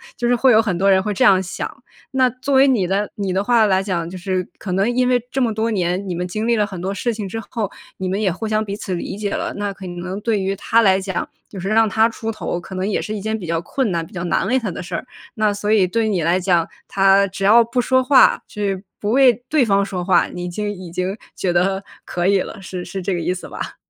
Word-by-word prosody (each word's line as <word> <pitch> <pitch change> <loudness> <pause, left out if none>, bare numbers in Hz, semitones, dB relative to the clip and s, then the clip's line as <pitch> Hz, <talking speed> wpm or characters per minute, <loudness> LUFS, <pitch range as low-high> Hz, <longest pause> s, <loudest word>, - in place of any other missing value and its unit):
就 240 - -1
是 245 - +3
会 260 +2 +4
有 220 -1 +6
很 200 -6 -1
多 195 +2 +3
人 190 0 +4
会 210 +2 -2
这 200 - +2
样 190 -2 +6
想。 190 0 -6 0.3
那 260 -1 +3
作 255 +3 -4
为 270 +1 +6
你 235 -9 +2
的 195 +3 0
你 195 -3 -2
的 190 +2 +1
话 230 0 +4
来 190 -2 +3
讲， 180 -4 -2
就 180 - -8
是 185 0 -2
可 190 - -5
能 195 +4 +2
因 250 0 +2
为 250 -1 +3
这 265 - -1
么 240 -3 +2
多 220 +2 -1
年， 185 -1 -1
你 180 - -2
们 180 +1 -3
经 215 +5 -3
历 235 - +3
了 210 -2 +1
很 190 -3 -7
多 190 +3 -3
事 235 +5 -1
情 210 -2 -4
之 225 +4 -5
后， 220 -5 -2 0.3
你 190 - -3
们 195 +3 -1
也 195 -3 +2
互 220 +6 -4
相 215 0 +1
彼 200 -1 -4
此 200 -2 -5
理 180 +2 -4
解 205 -1 -3
了， - - -2
那 205 -1 -2
可 190 -1 -9
能 180 +3 -5
对 220 -1 0
于 195 +1 -1
他 225 +3 +2
来 195 -3 +4
讲， 190 -2 -3 0.2
就 195 - -8
是 185 - -4
让 220 +1 +4
他 220 +2 +3
出 225 0 -4
头， 195 -5 -4
可 185 +2 -11
能 185 +1 -2
也 210 - 0
是 215 - -4
一 205 - -5
件 220 +2 -2
比 190 - -7
较 165 0 -1
困 260 +2 -1
难、 170 -1 -1
比 - - -18
较 175 -2 -4
难 180 +2 0
为 255 +5 +2
他 230 -7 -2
的 - - -6
事 180 - -5
儿， - - -4 0.3
那 215 -2 +2
所 205 +1 -2
以 210 -4 +5
对 220 +4 0
你 180 -6 0
来 175 +3 +2
讲， 175 -3 +2 0.2
他 195 0 +4
只 195 +1 -6
要 225 +4 +7
不 235 +2 -2
说 260 +1 +2
话 265 +1 +5
就 210 - -8 0.4
不 210 +1 -1
为 260 -1 +6 0.2
对 300 -3 +3
方 200 -2 +2
说 180 -2 -4
话， 180 -1 +3
你 180 0 -6
就 210 +4 -4
已 185 -4 -6
经 185 +2 -2 0.2
觉 180 -2 -1
得 190 +3 +1 0.2
可 175 -1 -2
以 195 -1 +3
了， - - -7
是 185 -1 -6
是 195 - -5
这 195 - -1
个 175 - -1
意 175 +2 0
思 180 - -8
吧？ - - -6
200 Hz, 300 characters per minute, -20 LUFS, 185-220 Hz, 0.4 s, 要